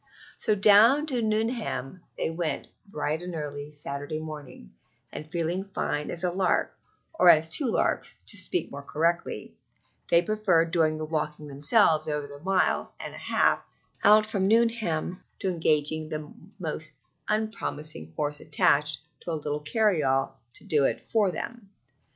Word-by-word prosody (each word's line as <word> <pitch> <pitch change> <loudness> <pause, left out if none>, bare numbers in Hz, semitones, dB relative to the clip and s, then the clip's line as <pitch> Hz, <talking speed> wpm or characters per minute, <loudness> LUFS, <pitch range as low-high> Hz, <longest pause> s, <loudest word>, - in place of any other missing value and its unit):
So 215 - +1
down 215 +8 +6
to 260 -6 -1
Nuneham 215 - -2 0.2
they - - -1
went 165 -1 -2 0.2
bright 155 -3 -2
and 175 -1 -6
early 145 -1 -5
Saturday 145 +1 -4
morning, 145 - -9 0.4
and, 155 - -7
feeling 170 +3 -1
fine 150 -6 -3
as 170 - -2
a 180 - +1
lark, 185 0 +1 0.4
or 180 - +5
as 160 -1 +6
two 260 - +1
larks, - - 0
to - - -3
speak 360 - 0
more 140 - -7
correctly, 165 +4 -1 0.6
they 170 0 +5
preferred 180 -5 +2
doing 160 -3 +2
the 155 - -4
walking 155 -1 -3
themselves 155 +3 +3
over 150 -1 -2
the 145 0 -11
mile 190 +3 0
and - - -6
a - - -9
half - - +2 0.4
out 215 +1 +7
from 200 -3 0
Nuneham 220 -7 +1
to 190 - -1
engaging 155 -2 +1
a 150 -1 -7 0.2
most 155 -3 -4 0.4
unpromising 160 - -3
horse 150 0 -2
attached 150 -1 +2 0.2
to 175 - -6
a - - -1
little 150 -1 -2
carry 200 +2 +2
all 135 -1 0
to - - -10
do 150 -3 +2
it - - -2
for 210 -4 +3
them. 230 +3 -6
165 Hz, 155 wpm, -27 LUFS, 150-200 Hz, 0.6 s, out